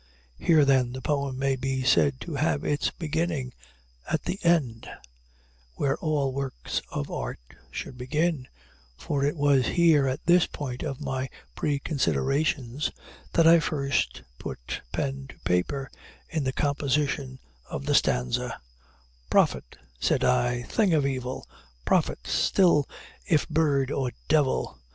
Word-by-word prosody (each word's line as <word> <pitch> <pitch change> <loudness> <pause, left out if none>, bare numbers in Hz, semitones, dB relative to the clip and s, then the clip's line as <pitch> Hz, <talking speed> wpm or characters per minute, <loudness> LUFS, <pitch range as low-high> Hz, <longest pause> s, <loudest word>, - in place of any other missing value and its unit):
Here 155 -3 +5
then 130 -3 +3
the 130 - -6
poem 140 -3 -1
may 135 0 +1
be 130 0 -2
said 135 +1 +3
to 170 - -6
have 145 0 0
its 145 - +1
beginning 160 -5 -2 0.6
at - - 0
the 190 - -3
end, 145 -10 +1 0.9
where 140 - +1
all 145 -4 0
works 135 - -3
of 70 - -4
art - - -4 0.3
should 125 - -7
begin 150 +1 0 0.5
for 140 - -2
it 145 +3 0
was 140 -4 +3
here, 160 -5 +5
at 130 - -3
this 175 0 +5
point 130 -4 -5
of 140 -4 -4
my 130 0 -2 0.3
preconsiderations, 140 - 0 0.4
that 165 - +4
I 165 0 +8
first 140 - -1 0.2
put 65 +3 -6
pen 135 -1 -3
to - - -14
paper 90 +10 -1 0.4
in 155 -4 -1
the 130 - +1
composition 140 -1 0 0.3
of 70 - -5
the - - +1
stanza: 60 0 +1 0.7
"'Prophet,' - - +2 0.2
said - - +1
I, 125 -1 +2
'thing 195 - +2
of 145 -3 +2
evil! 130 -2 -3 0.4
prophet - - +1
still 170 -7 +3 0.4
if 155 -3 +2
bird 145 -4 +2
or 130 -3 -1
devil! 145 - +1
140 Hz, 135 wpm, -27 LUFS, 130-150 Hz, 0.9 s, I